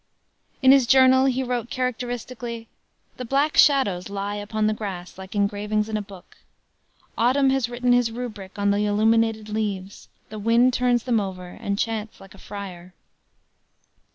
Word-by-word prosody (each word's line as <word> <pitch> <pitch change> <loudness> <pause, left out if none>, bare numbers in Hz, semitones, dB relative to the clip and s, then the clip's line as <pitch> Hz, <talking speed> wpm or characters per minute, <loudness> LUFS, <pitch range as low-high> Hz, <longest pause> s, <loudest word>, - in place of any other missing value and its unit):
In 260 - +8
his 270 -3 +5
journal 260 +1 +6
he 260 0 +1
wrote 245 -2 -3
characteristically: 245 -2 -4 0.5
"The 255 - -5
black 280 +5 0
shadows 205 - +3
lie 200 0 -4
upon 210 +1 -2
the 215 - +2
grass 190 -4 -6
like 190 +1 -9
engravings 210 +1 0
in 220 - -3
a 215 - -1
book. 195 -3 -14 0.8
Autumn 265 +3 +3
has 265 -3 0
written 245 0 +1
his 245 -1 +3
rubric 220 -5 -7
on 205 0 +1
the 205 +1 +1
illuminated 220 +1 +2
leaves, 205 -3 -4 0.2
the 215 - -7
wind 235 +4 +3
turns 245 -1 +1
them 240 -3 +1
over 185 -3 -5
and 200 +2 -4
chants 220 0 -3
like 195 -1 -14
a 195 - -16
friar." 185 -3 -9
220 Hz, 155 wpm, -23 LUFS, 200-245 Hz, 0.8 s, In